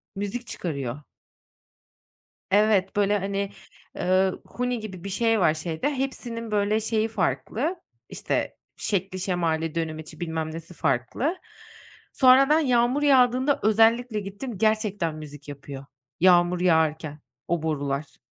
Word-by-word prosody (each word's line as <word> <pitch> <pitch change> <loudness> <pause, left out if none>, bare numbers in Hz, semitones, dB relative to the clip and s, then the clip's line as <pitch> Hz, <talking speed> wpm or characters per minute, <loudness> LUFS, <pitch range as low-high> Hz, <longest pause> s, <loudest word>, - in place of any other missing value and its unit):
Müzik 205 +5 -4
çıkarıyor. 140 - -4 1.5
Evet, 200 -1 +3
böyle, 205 0 +2
hani, 200 0 -2 0.5
ııı, 185 +1 +1
huni 250 -1 -2
gibi 190 -5 -8
bir - - -4
şey 225 +2 +1
var 155 -4 +4
şeyde, 160 - -2
hepsinin 245 -4 -4
böyle 210 +1 +1
şeyi 220 0 0
farklı, 220 - -1 0.3
işte, - - -2 0.2
şekli 190 -2 -2
şemali, 165 -4 -1
dönemeci 160 -1 -5
bilmem 160 -2 -3
nesi 165 +2 -9
farklı. 160 - -1 0.8
Sonra 265 +1 +6
ben 305 +1 +5
yağmur 250 0 +2
yağdığında 260 0 +4
özellikle 225 +1 +3
gittim, 205 +3 -7
gerçekten 210 -6 0
müzik 145 -2 -10
yapıyor, 140 -1 -8 0.4
yağmur 175 0 +5
yağarken 160 -3 +1 0.3
o 170 -2 0
borular. 145 -2 -3
195 Hz, 120 wpm, -25 LUFS, 160-230 Hz, 1.5 s, Sonra